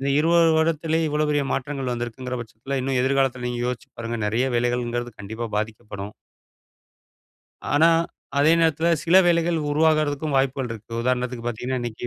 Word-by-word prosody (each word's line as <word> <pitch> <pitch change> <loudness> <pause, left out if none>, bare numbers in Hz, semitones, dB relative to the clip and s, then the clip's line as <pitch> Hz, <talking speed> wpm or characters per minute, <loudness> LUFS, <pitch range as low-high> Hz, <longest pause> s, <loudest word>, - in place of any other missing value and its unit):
இந்த 135 - -1
20 165 +1 +4
வருடத்திலே 160 0 +1
இவ்வளவு 150 0 0
பெரிய 145 -1 +2
மாற்றங்கள் 135 -1 -3
வந்திருக்கிங்கிற 120 +1 -4
பட்சத்தில 120 +4 -5
இன்னும் 130 0 -1
எதிர்காலத்தில 130 -2 +1
நீங்க 120 0 -3
யோசிச்சு 125 -1 -4
பாருங்க 115 0 -3
நெறைய 115 +5 +1
வேலைகள்ங்கிறது 120 0 -1
கண்டிப்பா 110 +3 -5
பாதிக்கப்படும். 105 -2 -5 1.6
ஆனா, 155 +3 +5 0.5
அதே 150 +3 +5
நேரத்துல 160 0 +2 0.2
சில 170 +2 +5
வேலைகள் 170 -1 +2
உருவாகுறதுக்கும் 155 -1 +1
வாய்ப்புகள் 135 -2 0
இருக்கு. 110 0 -11
உதாரணத்துக்கு 125 -1 -1
பார்த்தீங்கன்னா, 125 +2 -3
இன்னைக்கி 120 0 -5
130 Hz, 140 wpm, -23 LUFS, 120-150 Hz, 1.6 s, ஆனா